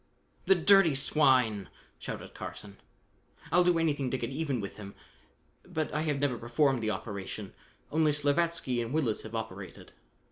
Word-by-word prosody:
"The 195 - +7
dirty 180 -3 +5
swine!" 130 -7 +3 0.3
shouted - - -7
Carson. 100 -1 -8 0.7
"I'll 180 - +5
do 175 -1 +3
anything 145 -5 0
to 130 - -1
get 120 0 -4
even 140 -3 -2
with 100 -2 -6
him, 100 -1 -9 0.7
but 155 -1 -3
I 150 - 0
have 150 -3 0
never 135 -4 0
performed 130 +2 +1
the 110 - -1
operation. 100 -1 -5 0.4
Only 155 0 +3
Slavatsky 145 -3 +1
and 115 +3 -4
Willis 135 -9 0
have 110 +1 -8
operated." 100 -5 -7
135 Hz, 150 wpm, -30 LUFS, 110-155 Hz, 0.7 s, The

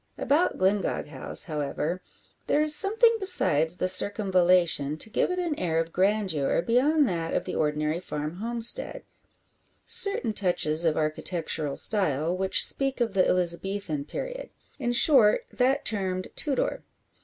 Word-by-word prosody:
About 305 +6 0
Glyngog 190 -5 -1
House, 135 -3 -5
however, 155 +2 -4 0.5
there 300 - +2
is 305 0 +2
something 450 +7 +2
besides 160 - +2
the 185 - -1
circumvallation 180 -6 +2
to 220 - -4
give - - 0
it 360 - -3
an 350 -3 -2
air 165 -3 -1
of 165 0 -4
grandeur 190 -6 0
beyond 275 - +2
that 165 -3 -3
of - - -2
the - - -5
ordinary 150 +1 -1
farm 150 -1 -6
homestead; 235 - 0 0.8
certain 395 - +2
touches 175 -5 +1
of 160 -2 +1
architectural 155 -1 -2
style 170 -5 +1
which 190 +1 +3
speak 270 -1 0
of 230 -4 -1
the 185 -2 +2
Elizabethan 180 -2 -2
period - - -7 0.3
in 240 -3 -2
short 240 -4 +5
that 265 +3 0
termed 185 -3 -2
Tudor. 285 -4 -2
185 Hz, 140 wpm, -26 LUFS, 160-245 Hz, 0.8 s, short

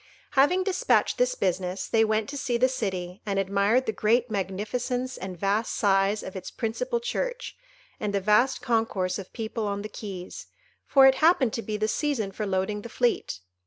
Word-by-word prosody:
Having 295 +7 +4
despatched 390 +4 +1
this - - +2
business, 185 - -1
they 225 -1 +3
went 220 0 +1
to 285 - -6
see 250 -4 -1
the 255 +2 +4
city, 190 -6 -4
and 200 -2 -2
admired 200 +6 +2
the 220 - 0
great 230 +3 +1
magnificence 230 +6 -2
and 185 -1 -6
vast 205 +4 0
size 195 +1 +2
of 190 - -8
its 185 - -6
principal 235 +1 -2
church, - - -3 0.4
and 210 - -2
the 200 - +1
vast 210 +6 +2
concourse 225 -6 0
of 190 - -9
people 225 -1 -3
on 200 0 -3
the 215 - -6
quays, 195 -4 -8 0.4
for 270 -1 +6
it 265 - +7
happened 310 -8 +4
to 230 - -2
be 215 -1 -3
the 215 +1 0
season 230 -5 -1
for 210 +2 -4
loading 195 +2 -1
the 235 - -9
fleet. 240 - -1
215 Hz, 185 wpm, -26 LUFS, 195-250 Hz, 0.4 s, it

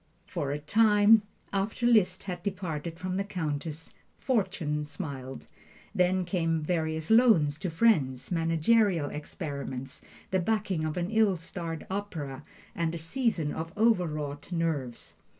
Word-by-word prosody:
For 165 -8 -3
a 145 - -1
time 210 +6 +5 0.3
after 200 +5 -1
Liszt 200 -6 +4
had 180 -3 -5
parted 165 -3 -5
from 185 +1 -3
the 195 - 0
Countess, 160 -4 -4 0.2
fortune 185 - 0
smiled. 135 -3 -6 0.5
Then 180 0 +2
came 165 -3 0
various 160 0 -1
loans 210 -11 +5
to 185 - -2
friends, 160 - +2
managerial 165 0 +2
experiments, 140 -4 -5 0.3
the 190 - +2
backing 195 -4 0
of 155 +2 -3
an 175 +3 -2
ill 220 -4 +3
starred 165 -1 -5
opera, 160 -9 -4 0.3
and 170 -1 -1
a - - -3
season 165 - 0
of 165 +1 -5
overwrought 155 -10 0
nerves. 160 -8 -2
165 Hz, 130 wpm, -29 LUFS, 150-195 Hz, 0.5 s, time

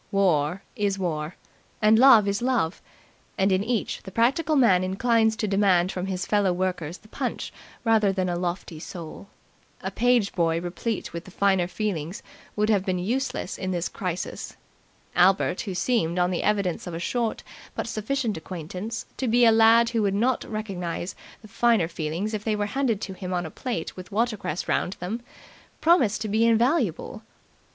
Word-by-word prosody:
War 180 -2 +2
is 205 -4 0
war, 160 -3 -3 0.4
and 215 +1 +5
love 235 -6 +7
is 200 +1 0
love, 240 -9 0 0.6
and 195 +1 +2
in 190 +1 +2
each 230 0 -2
the - - -9
practical 275 - +2
man 205 -10 +5
inclines 220 +4 +2
to 215 - -2
demand 190 -3 +3
from 185 +1 -4
his 185 -2 -2
fellow 205 -3 +2
workers 180 -2 -2
the 215 - -20
punch - - -4 0.3
rather 220 -3 +3
than 185 -1 -1
a 175 - -1
lofty 175 -2 -4
soul. 170 +2 -8 0.6
A - - -3
page 245 -4 +2
boy 165 -2 +1
replete 180 +5 -4
with 170 0 -6
the - - -11
finer 190 -1 +2
feelings 185 -4 -3 0.3
would 210 0 +1
have 205 -4 +2
been 185 -1 -1
useless 230 +2 -2
in 185 - -3
this 175 -2 -1
crisis. 180 -2 -5 0.6
Albert, 190 0 +3
who 195 -4 -5
seemed, 180 -6 0
on 180 0 +2
the 175 - -1
evidence 200 -4 0
of 175 - -5
a - - -4
short 230 +4 -2 0.3
but - - -2
sufficient 230 0 -2
acquaintance, 185 +6 -6
to 260 - -1
be 240 +1 +5
a 225 - +7
lad 225 +1 +6
who 230 -2 +1
would 200 -2 +1
not 240 +4 +1
recognize 185 -5 -4 0.3
the - - -11
finer 225 -5 +2
feelings 170 +6 -3
if 210 -1 -3
they 215 -1 0
were 205 0 -1
handed 235 -2 0
to 195 - -5
him 185 -1 -5
on 175 0 -1
a 160 - -7
plate 235 -11 -4
with 185 +2 -10
watercress 215 -6 -1
round 180 - 0
them, 205 +7 -5 0.6
promised 260 - +3
to 220 - -2
be 215 +2 +2
invaluable. 235 +7 +1
200 Hz, 175 wpm, -25 LUFS, 180-225 Hz, 0.6 s, love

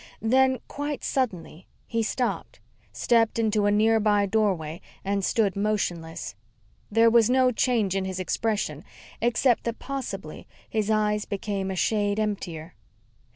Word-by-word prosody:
Then, 260 +3 +3
quite 290 0 -4
suddenly, 185 - -3 0.2
he 230 0 -1
stopped, 245 +3 -2 0.3
stepped 230 -2 +2
into 215 -2 +2
a - - +3
nearby 210 -1 +3
doorway 190 -6 0 0.2
and 200 0 0
stood 205 -1 +1
motionless. 185 -6 -2 0.6
There 225 +2 +4
was 230 -1 +5
no 255 0 +4
change 225 -5 +1
in 195 -1 0
his 190 -1 -4
expression 215 +3 -2 0.4
except 240 +1 +2
that 235 -1 -2
possibly 200 - -6 0.2
his 215 -1 -1
eyes 210 -1 +1
became 200 -1 -3
a 190 - -3
shade 205 +2 +1
emptier. 180 -6 -3
215 Hz, 130 wpm, -26 LUFS, 195-230 Hz, 0.6 s, was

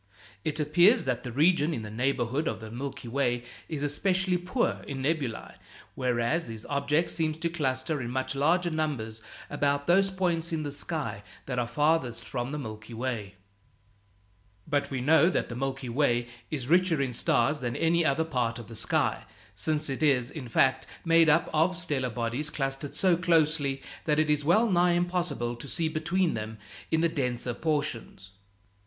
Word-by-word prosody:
It 155 0 -2
appears 175 - +4
that 125 -2 -1
the 125 - -6
region 155 +3 +3
in 110 - -5
the 105 - -7
neighborhood 130 +4 0
of 110 - -2
the 110 0 -9
Milky 125 +1 -6
Way 120 -1 0 0.3
is 150 -3 -3
especially 185 +5 +1
poor 180 +8 -1
in 135 -2 -4
nebulæ, 140 -6 -2 0.4
whereas 125 +5 0
these 115 -1 -8
objects 145 +3 0
seem 160 -2 0
to 160 +2 -2
cluster 145 -2 -1
in 120 - -4
much 130 +1 -2
larger 170 +5 +2
numbers 130 -9 -2 0.3
about 140 0 0
those 195 +4 +4
points 175 -3 -1
in 160 -2 -1
the 145 - -4
sky 140 -7 -3 0.2
that 125 -2 -2
are 120 - -1
farthest 150 -4 +1
from 120 0 -4
the 150 - -3
Milky 110 -3 -7
Way. 110 -5 -4 1.3
But 145 -1 0
we 130 -2 -3
know 160 +5 +5
that - - -1
the 120 - -5
Milky 135 0 -3
Way 120 -1 +1 0.2
is 140 -6 -3
richer 175 0 +3
in 135 -3 -1
stars 135 +5 +1
than 120 -2 -3
any 170 +1 +2
other 160 +1 +2
part 125 -7 -1
of 120 -2 -10
the - - -9
sky, - - 0 0.3
since 150 +10 +1
it 135 0 -4
is, 135 -4 +2
in 130 -6 -7
fact, 130 +3 +2 0.2
made 165 -1 +5
up 160 +2 +4
of 165 +4 +2
stellar 145 -8 -1
bodies 120 +6 -1
clustered 135 0 -3
so 180 +3 +4
closely 155 -5 +2 0.2
that 150 -1 +2
it 155 -1 +3
is 150 -1 +1
wellnigh 180 0 +4
impossible 175 -9 -1
to 130 - -9
see 160 +5 0
between 170 +3 0
them 110 0 -5 0.3
in 160 0 +2
the 170 - +4
denser 125 -6 -1
portions. 145 - -3
145 Hz, 175 wpm, -28 LUFS, 125-160 Hz, 1.3 s, know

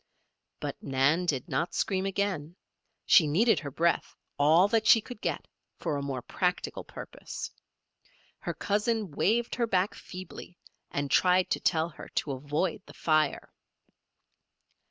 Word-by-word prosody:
But - - -5
Nan 140 +6 +2
did 135 -6 0
not 165 - -1
scream 190 0 0
again. 190 -5 -2 0.5
She 165 -6 +6
needed 215 +11 +3
her 145 - -6
breath, 170 +5 0 0.2
all 160 +6 +6
that 220 0 +2
she 225 - +8
could 230 +1 -10
get, - - -2 0.3
for 150 - -2
a 140 - -2
more 135 -3 -4
practical 180 +8 -2
purpose. - - -8 0.9
Her - - -4
cousin 210 -2 0
waved 230 +10 +1
her 235 -1 0
back 190 -1 +1
feebly, 180 -1 -10 0.3
and 145 -1 -3
tried 180 +3 +4
to - - +1
tell 165 -1 +1
her 155 - -11
to 145 - 0
avoid 145 +7 -2
the - - -13
fire. 155 -3 +1
175 Hz, 140 wpm, -29 LUFS, 145-200 Hz, 0.9 s, she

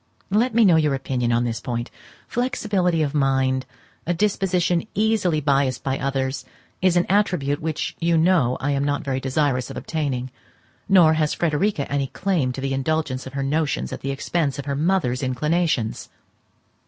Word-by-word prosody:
Let 225 +3 +2
me 230 -1 +6
know 175 -4 +6
your 150 -3 +2
opinion 125 -3 -1
on 120 +1 +2
this 115 -2 -2
point. 120 0 -4 0.4
Flexibility 205 -9 0
of 145 -1 -2
mind, 135 -2 +1 0.4
a 175 - +1
disposition 180 -2 +1
easily 210 -7 +2
biassed 135 -3 +1
by 135 0 -1
others, 135 -1 -2 0.4
is 180 -1 +3
an 175 - +3
attribute 180 -8 +1
which 155 -1 -3
you 170 0 +2
know 160 -7 +3
I 145 +2 -1
am 140 0 0
not 145 +2 -1
very 135 -2 -2
desirous 130 -1 0
of - - -7
obtaining; 135 -6 -3 0.6
nor 175 -5 +6
has 155 -1 0
Frederica 165 0 0
any 140 -1 0
claim 150 -2 -1
to 135 - -6
the 135 0 -1
indulgence 135 -1 -1
of 130 - -10
her 140 0 -2
notions 140 - -1
at - - -6
the 135 - -3
expense 140 +1 -1
of 140 - -6
her 140 -1 -2
mother's 150 -5 +1
inclinations. 140 -1 -1
145 Hz, 170 wpm, -23 LUFS, 135-175 Hz, 0.6 s, me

